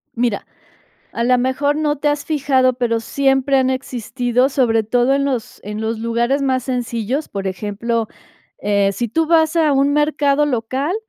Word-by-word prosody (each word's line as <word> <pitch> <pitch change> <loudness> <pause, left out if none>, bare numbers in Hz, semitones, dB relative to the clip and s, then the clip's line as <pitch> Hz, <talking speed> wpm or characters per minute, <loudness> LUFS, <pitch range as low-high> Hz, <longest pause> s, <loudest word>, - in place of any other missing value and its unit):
Mira, 235 -4 -1 0.7
a 235 - -2
la 250 +1 +3
mejor 270 +3 0
no 300 -1 0
te 295 +1 0
has 290 0 -1
fijado, 265 -4 +2
pero 235 -2 0
siempre 270 +2 +1
han 260 0 +2
existido 250 0 -1
sobre 240 -5 +2
todo 245 +4 +2
en 275 0 +1
los 255 -5 -3
en 210 +1 -6
los 220 0 -2
lugares 235 +4 0
más 260 -2 0
sencillos, 250 +2 -2
por 195 -1 -5
ejemplo, 215 +4 -2 0.5
eh, 200 -1 +1
si 235 +5 -3
tú 320 +9 0
vas 320 0 +3
a 315 -3 +3
un 275 +1 +2
mercado 295 -1 +2
local, 265 +5 -1
255 Hz, 170 wpm, -19 LUFS, 230-280 Hz, 0.7 s, la